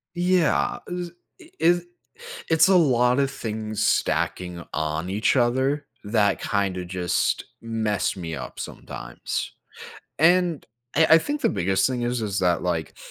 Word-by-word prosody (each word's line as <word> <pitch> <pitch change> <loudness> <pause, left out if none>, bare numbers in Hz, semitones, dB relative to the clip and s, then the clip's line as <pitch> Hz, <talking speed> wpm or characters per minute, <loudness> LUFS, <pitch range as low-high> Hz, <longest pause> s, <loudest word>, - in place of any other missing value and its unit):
Yeah, 175 -1 +2
is 180 -1 -4 0.3
i 340 -2 -16
is 175 +1 +3 0.6
it's 160 +2 +5
a 195 - +5
lot 125 -6 +4
of 135 -1 +1
things 110 -1 -4
stacking 90 -2 0
on 80 +4 -2
each 105 +6 +1
other, 130 +4 +1 0.2
that 105 -2 +1
kinda 100 -5 -1
just 90 -1 -1 0.2
mess 110 -4 -1
me 80 -3 -5
up - - -8
sometimes, - - -6 0.7
and 175 -1 +3 0.3
I 160 +1 +5
I 160 - +10
think 290 - -3
the - - +3
biggest 95 +2 +1
thing 125 -2 -2
is 120 0 -1
is 105 -2 -2
that, 90 -2 +2
like, 85 -3 -2
115 Hz, 140 wpm, -24 LUFS, -, 0.7 s, I